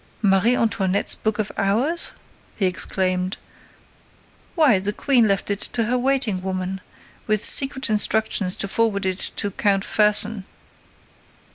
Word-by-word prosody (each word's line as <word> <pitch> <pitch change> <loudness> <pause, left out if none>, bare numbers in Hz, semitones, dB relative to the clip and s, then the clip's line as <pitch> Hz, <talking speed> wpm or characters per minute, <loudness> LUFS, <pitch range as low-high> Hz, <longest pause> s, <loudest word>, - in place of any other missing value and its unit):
"Marie 200 +5 +3
Antoinette's 200 -4 0
book 220 -1 -3
of 215 -2 -3
hours?" 240 - 0 0.5
he 200 - -1
exclaimed. 185 0 -1 1.2
"Why, 290 - +3
the 200 +2 -2
Queen 245 -1 +2
left 200 0 -1
it 200 - -2
to 235 - 0
her 235 +3 -1
waiting 250 -7 +1
woman, 185 0 -5 0.5
with 215 -1 +2
secret 265 -1 +4
instructions 215 -3 0
to 200 - -4
forward 205 -1 -1
it 185 0 -2 0.2
to 205 - -2
Count 195 0 0
Fersen. 210 -1 +1
205 Hz, 130 wpm, -21 LUFS, 190-230 Hz, 1.2 s, secret